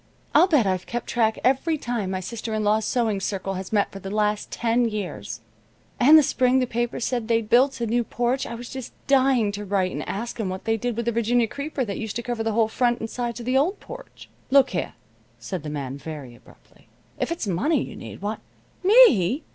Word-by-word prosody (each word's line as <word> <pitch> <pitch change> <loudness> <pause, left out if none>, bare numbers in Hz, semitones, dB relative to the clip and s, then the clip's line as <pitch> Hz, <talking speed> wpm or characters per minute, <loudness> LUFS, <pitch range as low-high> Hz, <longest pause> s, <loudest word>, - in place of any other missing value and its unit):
I'll 365 - +6
bet 300 - +3
I've 185 -2 -1
kept 240 -1 -4
track 225 -2 +1
every 270 +5 +2
time 235 -8 -3
my 185 0 -2
sister 220 +3 -5
in 215 - -1
law's 210 +1 +2
sewing 225 -5 0
circle 195 0 -3
has 190 0 -6
met 205 -2 +1
for 195 - -8
the 195 - -7
last 210 0 0
ten 235 0 +1
years, 115 - -5 0.6
and 295 +6 +8
the 310 - +6
spring 255 -1 +2
the 255 - +2
paper 240 0 -2
said 240 -1 -2
they 230 -1 +3
built 250 +5 +3
a 235 - -1
new 235 +2 +1
porch 245 +3 -1
I 235 - -5
was 240 +1 -8
just 260 -1 -7
dying 260 -6 +3
to 205 +1 -6
write 190 -2 0
and - - -4
ask'em 225 -1 -3
what 185 +1 -6
they 225 - +2
did 240 0 -3
with 235 - -2
the 235 - +1
Virginia 235 +1 +2
creeper 280 +2 -4
that 200 -3 -4
used 220 -3 -5
to 235 - -3
cover 240 -2 -3
the 225 -1 -1
whole 225 0 +3
front 240 +1 +1
and 225 - -5
sides 240 -1 -3
of - - -8
the 255 +2 +3
old 365 +8 0
porch." - - -11 0.2
"Look 270 0 +5
here," - - -3 0.4
said 185 -4 -5
the 150 - -6
man, 140 -2 -5
very 145 -5 -8
abruptly, 120 - -21 0.3
"if - - -1
it's 335 -7 -2
money 220 - +1
you - - -9
need, - - -10
why 210 +2 -2 0.3
" - - -35
"Me! 310 - +6
230 Hz, 225 wpm, -24 LUFS, 205-250 Hz, 0.6 s, and